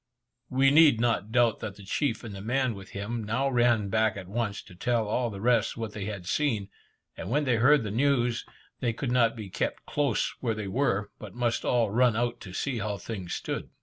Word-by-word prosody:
We 135 +1 +4
need 150 -6 +6
not 115 -3 0
doubt 120 -2 +3
that 100 - -5
the 100 - -13
chief 115 +5 -1
and 115 -3 -7
the 100 - -7
man 125 +3 0
with 95 -2 -10
him 110 +3 -4
now 115 +6 0
ran 120 -4 +3
back 110 0 +2
at 95 -2 -7
once, 105 0 -2
to - - -15
tell 115 +4 0
all 120 +3 0
the 100 -3 -7
rest 115 0 +2
what 110 -2 -4
they 105 -2 -5
had 100 -4 -5
seen; 110 -3 0 0.5
and - - -6
when 145 +5 +2
they 125 -4 +2
heard 140 +4 +5
the 105 - -4
news, 120 -1 +1 0.4
they 120 -3 0
could 120 +2 -3
not 120 -2 +3
be 110 -3 -7
kept 95 - -3
close 140 -6 0
where 115 -4 0
they 105 -2 -4
were, 105 -2 0
but 100 -3 -10
must 120 -1 0
all 115 -4 +2
run 120 +1 +3
out 120 +1 -1
to 90 - -9
see 125 +5 -2
how 105 -2 -2
things 95 -5 -5
stood. - - -4
115 Hz, 220 wpm, -28 LUFS, 105-125 Hz, 0.5 s, need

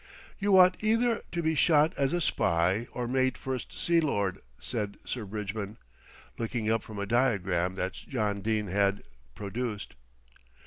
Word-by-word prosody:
"You 200 -1 +4
ought 185 +2 +6
either 230 +1 +2
to 170 -1 -2
be 160 0 +2
shot 155 0 +4
as 135 -1 +1
a 175 - 0
spy 90 - +1
or 125 -1 -3
made 130 +1 +1
First 130 -2 -5
Sea 170 -1 +3
Lord," 100 - 0 0.2
said 105 -4 -4
Sir 120 -4 -4
Bridgman, 105 +1 -5 0.6
looking 115 -1 -1
up 115 -1 +2
from 105 0 -10
a 100 - -2
diagram 95 -7 +1
that 95 0 -2
John 105 -6 -2
Dene 110 0 0
had 100 +1 +1 0.3
produced. 105 +1 -4
110 Hz, 150 wpm, -29 LUFS, 100-140 Hz, 0.6 s, ought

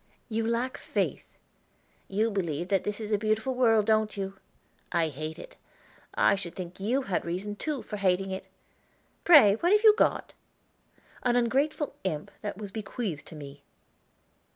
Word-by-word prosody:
"You 225 0 -1
lack 235 +3 -1
faith." - - -3 0.7
"You 215 +3 0
believe 175 -3 -2
that 195 -2 +2
this 210 +1 -3
is 215 -1 -5
a 210 - +2
beautiful 220 +4 0
world, 225 -4 +4
don't 215 -1 +2
you? 195 0 -5 0.5
I 170 -2 +1
hate 155 +2 -6
it. - - -11 0.6
I - - +4
should 190 -4 -4
think 180 -1 -7
you 245 +8 0
had 195 -7 -1
reason, 185 +5 -4
too, 290 +3 -3
for 210 - -6
hating 190 0 +1
it. 190 - -5 0.8
Pray 250 -12 +8
what 345 +9 +1
have 420 +1 +4
you 430 -1 +9
got?" - - +1 0.9
"An 245 -1 +2
ungrateful 275 +5 +1
imp 155 -6 -3
that 205 -3 -4
was 205 -2 -7
bequeathed 200 -6 -5
to - - -10
me." 140 -1 -10
210 Hz, 160 wpm, -28 LUFS, 190-235 Hz, 0.9 s, you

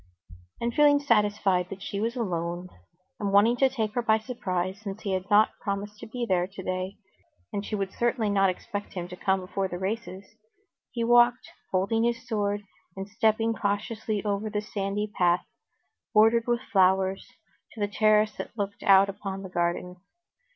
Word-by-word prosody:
And 235 0 -1
feeling 290 +1 +5
satisfied 205 -8 +2
that 195 0 -8
she 200 - -4
was 230 +3 -1
alone, 175 -5 -3 0.5
and 200 -1 -1
wanting 205 +4 +5
to 270 +1 +4
take 220 -5 -2
her 245 - 0
by 220 -2 +3
surprise, 190 -5 -3
since 200 -1 -7
he 200 - -2
had 185 +1 -3
not 210 +1 +4
promised 205 +1 -4
to - - -9
be 240 +2 -3
there 180 -2 +1
today, 185 0 -4 0.6
and 200 - -2
she 215 - -3
would 195 -2 -3
certainly 235 -3 0
not 195 -1 +4
expect 205 +2 -5
him 175 -2 -4
to 180 - -7
come 190 0 0
before 190 +1 -2
the 175 - -5
races, 195 0 -4 0.6
he 235 - -3
walked, 240 +1 +4 0.2
holding 200 +5 +1
his 235 0 -1
sword 205 -2 -1 0.3
and 195 +1 -6
stepping 220 +1 +1
cautiously 215 0 -2
over 205 +1 -1
the 210 0 -1
sandy 205 0 -2
path, 175 0 +3 0.7
bordered 225 +2 +5
with 240 0 +1
flowers, 190 0 +3 0.5
to 225 - -11
the 205 - +1
terrace 215 0 +3
that - - -7
looked 200 -1 -3
out 195 0 +6
upon 195 -1 -5
the 190 - -7
garden. 175 +1 -2
205 Hz, 170 wpm, -27 LUFS, 190-225 Hz, 0.7 s, out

